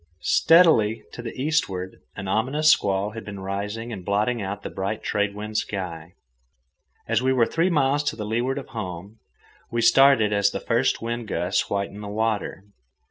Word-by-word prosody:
Steadily, 115 -11 +4
to - - -8
the 120 +1 -7
eastward, 95 - -1
an 100 - -6
ominous 135 +10 +3
squall 100 +1 +1
had 110 0 -8
been 100 -2 -8
rising 105 +4 -4
and 95 -4 -7
blotting 105 +5 0
out 100 +1 -5
the - - -4
bright 100 +3 -3
trade 100 -1 -1
wind 105 +1 -3
sky. 90 -3 -6 0.9
And - - +2
we 130 +1 +2
were 125 -3 +3
three 165 +8 +1
miles 145 -3 +2
to 145 -8 -2
leeward 120 +5 -1
of - - -7
home. 100 -2 -7 0.5
We 120 0 -1
started 115 -3 +5
as 100 -1 +3
the - - -4
first 120 0 0
wind 115 0 -3
gusts 90 -1 0
whitened 100 +1 -3
the - - -6
water. 105 -2 -2
110 Hz, 170 wpm, -24 LUFS, 100-120 Hz, 0.9 s, started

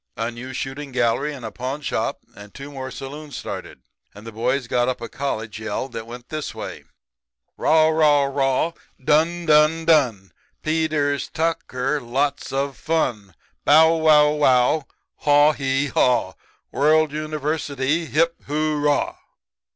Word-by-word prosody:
A 115 +1 -2
new 120 +3 -8
shooting 135 +2 -5
gallery 125 +4 +1
and 135 -5 -8
a 110 - -5
pawn 130 +8 -5
shop - - -2
and 105 0 -12
two 140 +1 -8
more 130 -2 -6
saloons 145 +1 -8
started; - - -7 0.3
and 105 +2 -12
the 115 - -7
boys 120 +4 -1
got 120 +1 +1
up 130 - -3
a 115 - -6
college 110 -6 -4
yell 110 +4 -3
that 115 -2 -7
went 120 +1 -10
this 155 -1 -5
way: - - -7 0.7
"'Raw, 155 0 +4
raw, 150 -3 +4
raw, 140 +3 +1 0.3
Done, 160 +5 +1
done, 155 +1 +4
done, 125 -12 +2 0.3
Peters, 155 -3 0
Tucker, 150 -3 -1
Lots 140 +4 -1
of 135 0 -2
fun, 110 - -2 0.3
Bow 160 +2 +6
wow 150 -2 +5
wow, 140 0 +3 0.3
Haw 145 +1 +5
hee 135 0 -1
haw, 120 -8 +2 0.4
World 155 +1 +3
University, 155 0 -2
Hip, 165 +2 +1
hurrah!' 150 0 0
145 Hz, 140 wpm, -22 LUFS, 125-155 Hz, 0.7 s, Bow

